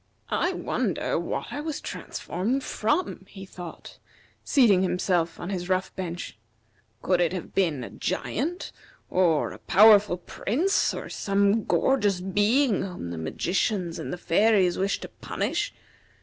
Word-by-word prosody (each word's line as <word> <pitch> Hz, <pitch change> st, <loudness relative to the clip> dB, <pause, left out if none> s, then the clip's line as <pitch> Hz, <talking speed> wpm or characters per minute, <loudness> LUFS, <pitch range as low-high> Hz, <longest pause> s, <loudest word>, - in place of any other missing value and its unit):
"I -, -, +1 dB
wonder -, -, -1 dB
what -, -, -4 dB
I 290 Hz, -, -3 dB
was 310 Hz, -1 st, -4 dB
transformed 235 Hz, +10 st, -3 dB
from?" 220 Hz, -, -1 dB
he 195 Hz, -1 st, -10 dB
thought, 180 Hz, -2 st, -10 dB, 0.4 s
seating 225 Hz, -, +4 dB
himself 180 Hz, -2 st, 0 dB
on 175 Hz, -, -5 dB
his 180 Hz, -1 st, -4 dB
rough 185 Hz, 0 st, 0 dB
bench. 175 Hz, -, -6 dB, 0.6 s
"Could 180 Hz, -1 st, +2 dB
it 175 Hz, 0 st, +1 dB
have 185 Hz, -, -6 dB
been 165 Hz, -9 st, +1 dB
a -, -, -8 dB
giant, 290 Hz, -, -3 dB, 0.4 s
or 170 Hz, -5 st, +2 dB
a -, -, -10 dB
powerful 205 Hz, -2 st, +6 dB
prince, 290 Hz, -, 0 dB
or -, -, -6 dB
some 200 Hz, +2 st, +1 dB
gorgeous 210 Hz, -9 st, +2 dB
being 205 Hz, +6 st, +2 dB
whom 180 Hz, -, -5 dB
the 85 Hz, -, -5 dB
magicians 175 Hz, -, -1 dB
or -, -, -5 dB
the 180 Hz, -, -4 dB
fairies 185 Hz, +1 st, +3 dB
wished 195 Hz, +1 st, -1 dB
to -, -, -5 dB
punish? -, -, -3 dB
190 Hz, 140 wpm, -26 LUFS, 180-215 Hz, 0.6 s, powerful